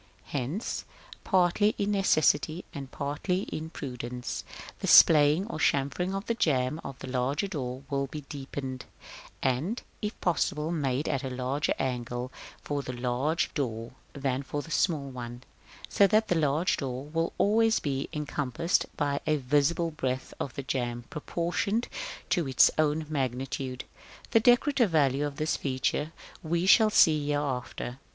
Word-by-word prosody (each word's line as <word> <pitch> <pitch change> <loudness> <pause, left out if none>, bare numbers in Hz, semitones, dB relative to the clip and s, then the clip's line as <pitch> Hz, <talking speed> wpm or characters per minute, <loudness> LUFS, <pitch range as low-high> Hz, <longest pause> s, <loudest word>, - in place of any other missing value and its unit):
Hence, 145 - -2 0.4
partly 190 +3 +3
in 205 0 0
necessity 175 -3 +2
and 140 -3 -6
partly 150 +6 -2
in 160 +1 -4
prudence, 125 -5 -5 0.4
the - - -3
splaying 155 +3 +7
or 220 -7 -6
chamfering 150 +8 +1
of 195 +2 -4
the 230 - 0
jamb 150 - +1
of 135 - -7
the - - -8
larger 130 +8 0
door 130 -7 -4
will 140 0 -1
be 150 +3 -7
deepened, 135 -2 -6 0.6
and, 145 - 0 0.2
if 210 0 -4
possible, 160 -2 0
made 140 -3 -1
at 140 -4 -1
a 135 - -3
larger 130 +3 -1
angle 125 -1 -3 0.3
for 145 -1 -2
the 130 - -6
large 125 +6 -1
door 115 -5 -3 0.2
than 135 -1 -1
for 145 +1 -4
the 165 - -11
small 155 -3 +1
one; 120 -1 -7 0.4
so 200 - +4
that 215 +3 +2
the - - +4
large 155 +2 +2
door 130 -1 -4
will 165 +2 -1
always 220 +2 +3
be 140 -2 -2
encompassed 150 0 -1
by 140 -1 0
a 155 - +3
visible 150 +5 +1
breadth 130 -4 -3
of 135 - -4
jamb 120 -2 -2
proportioned 175 +8 -1 0.4
to 175 -5 +2
its 130 -2 +5
own 155 0 +2
magnitude. 130 -2 -3 0.5
The 225 - +6
decorative 245 +1 +4
value 145 -3 +2
of 145 - -7
this 155 +2 0
feature 140 +3 -1 0.3
we 170 +2 0
shall 215 +3 +7
see 155 -7 +5
hereafter. 135 -3 -2
145 Hz, 145 wpm, -28 LUFS, 130-170 Hz, 0.6 s, splaying